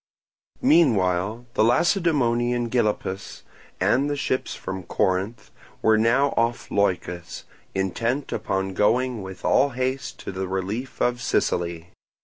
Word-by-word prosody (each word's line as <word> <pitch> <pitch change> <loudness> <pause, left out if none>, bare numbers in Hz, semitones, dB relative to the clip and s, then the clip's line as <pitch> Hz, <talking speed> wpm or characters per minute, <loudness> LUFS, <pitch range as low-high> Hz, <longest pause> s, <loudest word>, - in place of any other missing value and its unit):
Meanwhile 110 - +3
the - - +3
Lacedaemonian, 120 - +2
Gylippus, 105 -5 -1 0.4
and 140 +3 +2
the 145 - 0
ships 130 -2 -2
from 95 0 -5
Corinth 95 +5 -1 0.3
were 110 - +5
now 115 +6 +3
off 115 +1 0
Leucas, 90 -3 -1 0.3
intent 115 +8 -1
upon 95 0 -2
going 120 +4 +1
with 95 0 -8
all 140 - +4
haste 130 +1 -2
to - - -5
the 95 0 -4
relief 100 +7 -4
of 120 0 0
Sicily. 85 -7 -1
115 Hz, 120 wpm, -24 LUFS, 95-130 Hz, 0.4 s, were